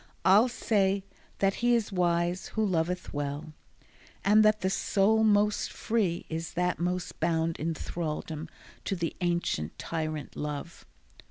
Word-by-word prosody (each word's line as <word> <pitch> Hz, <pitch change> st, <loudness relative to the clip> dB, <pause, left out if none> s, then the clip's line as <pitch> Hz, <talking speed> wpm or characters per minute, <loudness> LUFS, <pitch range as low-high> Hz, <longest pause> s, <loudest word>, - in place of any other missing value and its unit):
I'll 205 Hz, +6 st, +7 dB
say 200 Hz, -5 st, +1 dB, 0.3 s
that 195 Hz, 0 st, +2 dB
he 240 Hz, 0 st, +4 dB
is 225 Hz, -3 st, -1 dB
wise 175 Hz, 0 st, +1 dB
who 220 Hz, -1 st, 0 dB
loveth 180 Hz, -1 st, -1 dB
well, 145 Hz, +2 st, -4 dB, 0.7 s
And 210 Hz, +2 st, +6 dB
that 215 Hz, 0 st, +4 dB
the 190 Hz, -, +1 dB
soul 210 Hz, +3 st, +2 dB
most 210 Hz, -1 st, +3 dB
free 200 Hz, -7 st, -1 dB
is 165 Hz, +1 st, -4 dB
that 180 Hz, +1 st, 0 dB
most 180 Hz, 0 st, -2 dB
bound 165 Hz, 0 st, 0 dB
In 165 Hz, +1 st, -1 dB
thraldom 160 Hz, -1 st, -4 dB, 0.4 s
to 195 Hz, -, -1 dB
the 170 Hz, -2 st, -3 dB
ancient 170 Hz, -, -1 dB
tyrant 155 Hz, -2 st, -4 dB
Love. 150 Hz, +2 st, -5 dB
175 Hz, 140 wpm, -29 LUFS, 160-205 Hz, 0.7 s, I'll